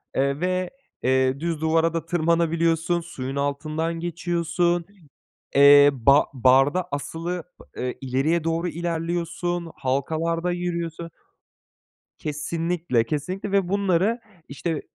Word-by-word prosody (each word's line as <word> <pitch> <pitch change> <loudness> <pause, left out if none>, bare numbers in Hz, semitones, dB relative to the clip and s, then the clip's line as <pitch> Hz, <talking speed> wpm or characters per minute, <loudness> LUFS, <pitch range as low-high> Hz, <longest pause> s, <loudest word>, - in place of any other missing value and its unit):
eee, 140 +1 +1
ve, 185 +1 -1 0.3
eee, 130 +1 +2
düz 165 -1 -3
duvara 165 +1 +2
da 165 -1 -3
tırmanabiliyorsun, 170 0 +1
suyun 135 -6 -6
altından 155 +4 -2
geçiyorsun, 170 0 -1 0.7
eee, 145 +1 +8
ba 140 +3 +4
barda 135 +7 +3
asılı 165 +4 -4 0.3
pı 125 0 -3
ileriye 135 +6 0
doğru 165 +2 -1
ilerliyorsun, 170 0 -3
halkalarda 160 +6 -1
yürüyorsun. 170 -1 -3 1.1
Kesinlikle, 155 -2 -1
kesinlikle 180 - -4
ve 195 -3 +1
bunları, 200 +3 +1 0.3
işte, 155 +2 -3
165 Hz, 100 wpm, -24 LUFS, 145-175 Hz, 1.1 s, eee